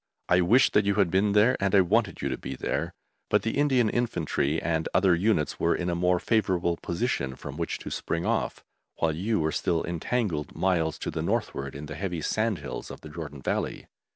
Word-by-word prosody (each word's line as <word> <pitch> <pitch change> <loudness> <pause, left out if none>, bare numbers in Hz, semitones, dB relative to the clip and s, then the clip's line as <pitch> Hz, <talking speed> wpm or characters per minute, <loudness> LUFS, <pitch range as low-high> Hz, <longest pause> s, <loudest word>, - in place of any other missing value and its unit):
I 90 +1 +4
wished 115 +9 +4
that 105 - +5
you 100 - +2
had 95 -5 +2
been 100 +2 +2
there, 110 +5 +5
and 100 0 +1
I 95 - +7
wanted 100 0 +1
you - - 0
to - - -2
be 65 - -5
there, - - -2 0.4
but - - +3
the 115 - -1
Indian 130 -5 +3
Infantry 85 - 0
and 80 -1 -1
other 95 -1 +5
units 85 -3 +1
were 85 - +2
in 90 0 -1
a - - -1
more 90 +1 +2
favourable 90 -6 +1
position 85 - -2
from 70 +1 -8
which 85 +1 -2
to - - -8
spring 85 +1 -2
off, - - -1 0.3
while 80 -2 0
you 105 +6 0
were 80 0 +1
still 85 0 0
entangled 85 - -2
miles 85 -4 +1
to - - -4
the - - -3
northward 70 0 -2
in 75 +2 -6
the 75 - -7
heavy 85 +1 -3
sandhills 110 +3 -2
of - - -9
the 75 - -10
Jordan 75 -4 -8
Valley. - - -2
90 Hz, 210 wpm, -27 LUFS, 80-105 Hz, 0.4 s, I